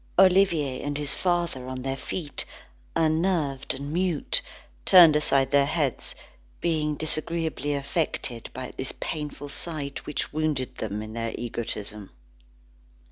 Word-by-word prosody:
Olivier 180 -8 +4
and 145 0 -2
his 145 -1 0
father 170 -8 0
on 130 -1 -5
their 135 0 -1
feet, 150 +2 -3 0.5
unnerved 160 -5 +1
and 140 +3 -5
mute, 185 - +2 0.4
turned 175 -5 +9
aside 135 -3 +3
their 140 -1 +5
heads, 145 -5 -1 0.4
being 155 -3 0
disagreeably 155 -1 -1
affected 140 -4 -2
at 130 0 -6
this 130 - -2
painful 150 -2 -4
sight 145 -2 -3
which 150 - -2
wounded 150 -5 0
them 105 -1 -3
in 110 0 -8
their 115 0 -3
egotism. 105 -4 -3
145 Hz, 125 wpm, -26 LUFS, 130-160 Hz, 0.5 s, turned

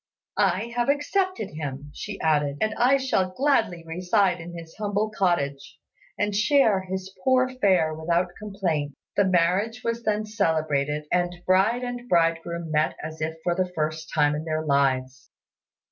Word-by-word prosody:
"I 235 +1 +1
have 240 +2 +1
accepted 370 - 0
him," 145 -2 -6 0.3
added 150 -3 +2
she, - - -14
"and 215 0 0
I 255 +3 +4
shall 255 -9 0
gladly 225 - +1
reside 180 +2 +1
in 175 +1 -8
his 165 -1 -11
humble 210 +1 -1
cottage, 145 -9 -1 0.4
and 210 -1 0
share 215 -3 +4
his 190 0 -5
poor 255 0 +4
fare 190 -11 +2
without 170 +3 0
complaint." 175 -9 -2 0.2
The 200 - +4
marriage 190 +6 +1
was 230 0 -1
then 215 -1 0
celebrated, 155 -8 0
and 175 0 +1
bride 200 +7 +3
and 245 0 -5
bridegroom 165 -1 +1
met 155 0 +1
as 155 0 -7
if 160 +1 -2
for 175 - +1
the 180 0 -1
first 155 0 -3
time 150 -2 +3
in 150 +1 -3
their 155 -1 -2
lives. 135 -2 0
180 Hz, 155 wpm, -25 LUFS, 155-215 Hz, 0.4 s, I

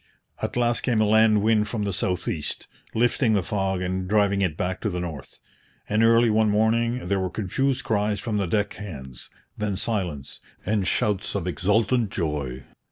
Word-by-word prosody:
At - - -3
last 120 -1 +2
came 120 -4 +1
a 110 - +4
land 110 -1 +4
wind 110 -1 +3
from 105 0 -3
the 100 -1 -2
south 90 0 -2
east, 75 - -3 0.3
lifting 120 0 +2
the 100 - +1
fog 95 -1 -1
and 90 0 -2
driving 100 -1 +2
it 85 -5 0
back 90 +1 -2
to 105 - 0
the 90 -2 -3
north. 80 -6 -7 0.5
And 110 +2 +2
early 115 0 +5
one 110 0 +3
morning 115 +2 +1
there 100 +2 0
were 95 -1 -1
confused 130 +8 -1
cries 105 -1 0
from 110 0 -2
the 100 -3 0
deck 105 +3 0
hands 65 -11 -8 0.3
then 105 -2 -1
silence 90 -10 -3 0.2
then 105 -1 0
shouts 105 +2 0
of 95 -4 -2
exultant 110 +5 +1
joy! 75 -8 -3
105 Hz, 180 wpm, -25 LUFS, 90-110 Hz, 0.5 s, early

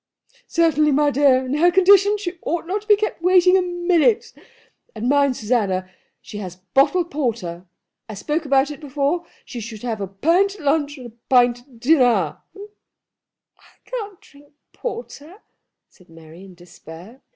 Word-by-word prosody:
"Certainly, 305 -3 +2
my 295 +1 +2
dear. 265 -2 +3
In 255 - -4
her 345 +3 +4
condition 395 +3 +4
she 365 -4 -6
ought 335 +1 -3
not 390 +4 -3
to 420 - -22
be 420 - +6
kept 425 -4 -4
waiting 365 +1 +4
a 380 - +4
minute. 360 +6 +1 0.6
And 220 +2 -4
mind, 280 -1 +2
Susanna, 200 -5 -1 0.3
she 210 - -10
has 185 -3 -7
bottled 275 - 0
porter. 210 - -4 0.4
I 215 - -7
spoke 300 +10 -3
about 275 0 +1
it 290 - -9
before. 295 +4 -2 0.2
She 245 - -8
should 220 -1 -9
have 225 -4 -4
a 195 - -3
pint 335 - +1
at 390 - -13
lunch 290 0 0
and 255 - -11
a 240 - -10 0.2
pint 245 -1 +4
at 245 -1 -21
dinner." 250 -3 +2 0.2
"I 415 +1 -20
can't 420 -6 -7
drink 285 0 -21 0.2
porter," 410 -6 -8 0.4
said 180 -3 -24
Mary, 165 +3 -15
in 185 -2 -15
despair. 175 - -14
285 Hz, 160 wpm, -20 LUFS, 230-355 Hz, 0.6 s, be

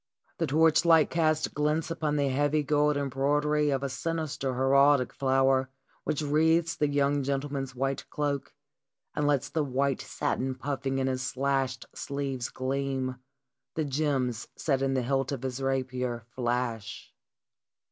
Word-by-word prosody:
The - - +1
torchlight 160 +2 +4
casts 155 -2 +2
glints 150 +2 -1
upon 155 -2 -1
the 140 -2 +1
heavy 145 +3 +1
gold 150 0 +2
embroidery 145 +2 +1
of 135 -1 0
a - - 0
sinister 150 -3 -2
heraldic 135 0 +4
flower 135 0 +2 0.4
which 150 - -1
wreathes 160 +3 +2
the 150 - +1
young 145 0 +1
gentleman's 135 -1 -2
white 135 +2 -2
cloak, 145 -2 -2 0.6
and 150 - +1
lets 145 -4 +2
the 160 - 0
white 135 0 0
satin 130 0 -2
puffing 135 0 -2
in 135 - +1
his 130 -1 -1
slashed 135 +1 -1
sleeves 135 -3 -3
gleam, 130 -1 -2 0.6
the 155 - 0
gems 135 -5 -1
set 135 -4 0
in 135 0 +1
the 130 - +1
hilt 135 +1 0
of 135 -2 -4
his 130 0 -3
rapier 130 -3 -2
flash. 120 -3 -3
140 Hz, 140 wpm, -28 LUFS, 130-150 Hz, 0.6 s, torchlight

